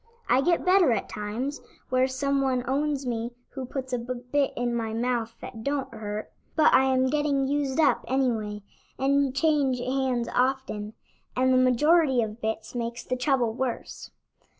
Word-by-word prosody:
I 255 - +4
get 345 +4 +1
better 365 -6 +5
at 215 - -2
times 225 +7 -4 0.3
where 255 0 +3
some 275 +1 0
one 255 -2 0
owns 280 +1 0
me 235 0 -3 0.2
who 265 -2 -6
puts 260 -1 -5
a 250 - +1
bit 250 +3 -1
in 240 0 0
my 225 -2 -2
mouth 230 -1 -1
that 225 -2 -8
don't 275 -2 -2
hurt; 215 -1 -5 0.2
but 310 -1 +5
I 265 - +6
am 260 -1 +2
getting 290 -2 +1
used 285 0 -1
up 300 -3 +3
anyway, 225 -6 -1 0.3
and 275 0 +2
change 285 -4 +2
hands 255 -1 -1
often, 250 -5 0 0.4
and 260 +1 +3
the - - +5
majority 260 +1 +4
of 220 +1 -6
bits 220 0 -3
makes 235 -1 -4
the 255 - -2
trouble 250 -3 +1
worse." 255 0 -4
255 Hz, 165 wpm, -26 LUFS, 235-275 Hz, 0.4 s, I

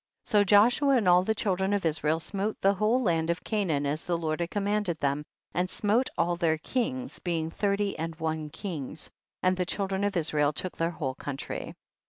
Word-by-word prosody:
51. - - -10
So 210 -2 +6
Joshua 220 +8 +5
and 215 -6 +1
all 180 0 +7
the 220 +3 0
children 190 -1 0
of 200 -3 0
Israel 155 0 +1
smote 200 +5 -3
the 195 +1 +4
whole 215 +6 +2
land 165 -4 +1
of 170 +1 -1
Canaan 175 -10 0
as 150 +3 -1
the 175 -1 0
Lord 155 -1 -2
had 170 0 -1
commanded 205 -3 0
them, 140 0 0 0.3
and 180 +2 0
smote 220 +7 +1
all 175 +1 +2
their 165 -2 +1
kings, 255 - -3
being 165 -2 -2
thirty 200 +1 0
and 165 0 -3
one 160 -1 -3
kings, 160 -4 -6 0.3
and 185 0 +3
the 185 - 0
child 195 0 -2
ren 190 +1 0
of 205 -2 0
Israel 150 -2 +1
took 185 +5 -4
their 165 0 0
whole 145 -6 -3
country. 135 0 -6
180 Hz, 205 wpm, -28 LUFS, 160-205 Hz, 0.3 s, all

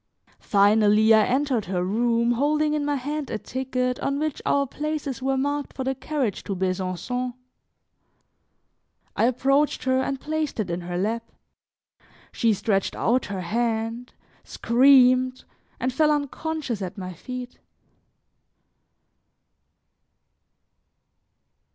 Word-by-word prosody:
Finally, 210 +2 +4
I 215 -1 +5
entered 260 -4 0
her 180 -1 -1
room 235 +4 +1
holding 300 +4 +1
in 300 -1 0
my 290 0 0
hand 290 +2 -4
a 220 - -2
ticket 255 +1 -2
on 275 - -1
which 305 -1 -2
our 280 0 +2
places 290 -2 -4
were 270 0 0
marked 285 +1 -2
for 265 - -4
the 265 +1 0
carriage 270 -5 -3
to 195 - -3
Besancon. 190 +7 -2 1.8
I - - +2
approached 275 +4 +1
her 260 0 +2
and 270 0 -2
placed 310 -3 -3
it 190 -5 -1
in 170 +1 -3
her 175 0 -4
lap; 225 +5 -2 1.0
she 230 -2 +2
stretched 200 -1 0
out 250 +2 +1
her 195 -2 -4
hand, 225 +4 -2 0.3
screamed 255 0 +4 0.4
and 255 0 -1
fell 305 +3 +3
unconscious 295 -4 -2
at 185 0 -5
my 185 -1 -6
feet. 250 +7 -8
250 Hz, 120 wpm, -24 LUFS, 215-275 Hz, 1.8 s, I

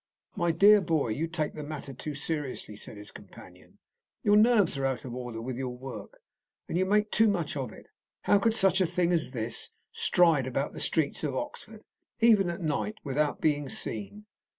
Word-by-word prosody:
"My 175 -4 0
dear 200 +5 +6
boy, 160 -8 0
you 150 +10 -1
take 160 -3 -3
the 155 - -7
matter 145 -2 -7
too 145 +3 -6
seriously," 145 -7 -4
said 105 - -9
his 105 0 -10
companion. - - -15 0.5
"Your 205 - +4
nerves 215 -5 +4
are 135 0 -2
out 130 -1 -3
of 125 - -6
order 125 -2 -6
with 120 +2 -5
your 125 -2 -4
work, 125 -6 -9 0.4
and - - -4
you 185 +2 +1
make 210 +1 +2
too 225 +1 +4
much 175 -9 -1
of 130 -5 -4
it. - - -14 0.4
How 205 - +4
could 225 +2 +2
such 195 -3 +3
a 185 - +3
thing 175 0 +1
as 160 -7 0
this 115 -3 -2 0.2
stride 165 -7 +3
about 135 +2 -2
the - - -7
streets 160 -1 0
of 140 -4 -2
Oxford, 215 +10 -6 0.4
even 215 -5 +5
at 170 +2 -5
night, 160 +7 -1
without 145 +1 -1
being 145 -3 +1
seen?" 115 - -4
155 Hz, 195 wpm, -28 LUFS, 130-190 Hz, 0.5 s, dear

